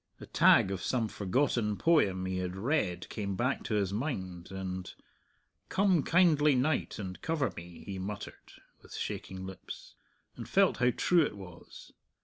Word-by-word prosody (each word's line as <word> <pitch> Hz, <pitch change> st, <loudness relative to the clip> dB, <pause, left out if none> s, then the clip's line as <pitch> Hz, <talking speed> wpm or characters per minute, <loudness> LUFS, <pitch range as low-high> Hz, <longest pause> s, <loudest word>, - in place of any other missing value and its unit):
A -, -, -9 dB
tag 95 Hz, -, +5 dB
of 95 Hz, -2 st, -3 dB
some 120 Hz, +1 st, 0 dB
forgotten 105 Hz, +1 st, 0 dB
poem 100 Hz, -, +3 dB
he 95 Hz, 0 st, -2 dB
had 90 Hz, 0 st, -3 dB
read 105 Hz, -, -1 dB
came 100 Hz, -2 st, -3 dB
back 130 Hz, +6 st, 0 dB
to 110 Hz, -, -1 dB
his 100 Hz, -2 st, 0 dB
mind, 95 Hz, -, -4 dB
and, 95 Hz, -1 st, -5 dB, 0.8 s
"Come, 190 Hz, -4 st, +3 dB
kindly 155 Hz, -4 st, +4 dB
night, 130 Hz, +3 st, 0 dB
and 95 Hz, -3 st, -6 dB
cover 160 Hz, -5 st, 0 dB
me," 85 Hz, 0 st, -10 dB
he 95 Hz, -1 st, -5 dB
muttered, 100 Hz, +2 st, -7 dB, 0.3 s
with -, -, -12 dB
shaking 95 Hz, 0 st, -5 dB
lips; 95 Hz, -1 st, -9 dB, 0.4 s
and -, -, -8 dB
felt -, -, +3 dB
how 125 Hz, +1 st, +3 dB
true 175 Hz, +7 st, +3 dB
it 145 Hz, -, -1 dB
was. 90 Hz, -3 st, -12 dB
105 Hz, 155 wpm, -31 LUFS, 95-140 Hz, 0.8 s, tag